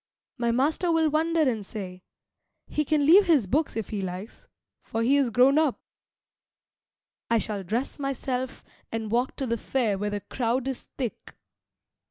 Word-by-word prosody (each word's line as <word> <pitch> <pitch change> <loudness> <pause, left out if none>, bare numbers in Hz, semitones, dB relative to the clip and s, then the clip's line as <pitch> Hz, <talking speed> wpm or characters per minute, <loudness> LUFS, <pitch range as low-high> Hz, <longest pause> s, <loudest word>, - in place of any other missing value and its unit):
My 235 -1 +1
master 305 +8 +1
will 320 -2 +3
wonder 325 +2 +2
and 225 -5 0
say, 185 -3 -7 0.6
"He 300 - -1
can 300 -1 +2
leave 375 +6 +7
his 300 - +4
books 290 - 0
if 225 -3 -3
he 205 -2 -3
likes, 185 +3 -7 0.3
for 225 - -2
he 265 +4 +4
is 275 -3 +3
grown 255 +6 +5
up." 305 -5 +1 1.5
I 230 - +4
shall 210 -3 -2
dress 235 - -3
myself 260 -2 -3 0.3
and 225 -1 -3
walk 245 +3 +1
to 270 - -3
the 235 -1 -1
fair 220 -7 0
where 205 +1 -1
the 205 0 -3
crowd 240 +5 -1
is 265 -2 -4
thick. 245 -5 -5
250 Hz, 165 wpm, -26 LUFS, 215-285 Hz, 1.5 s, leave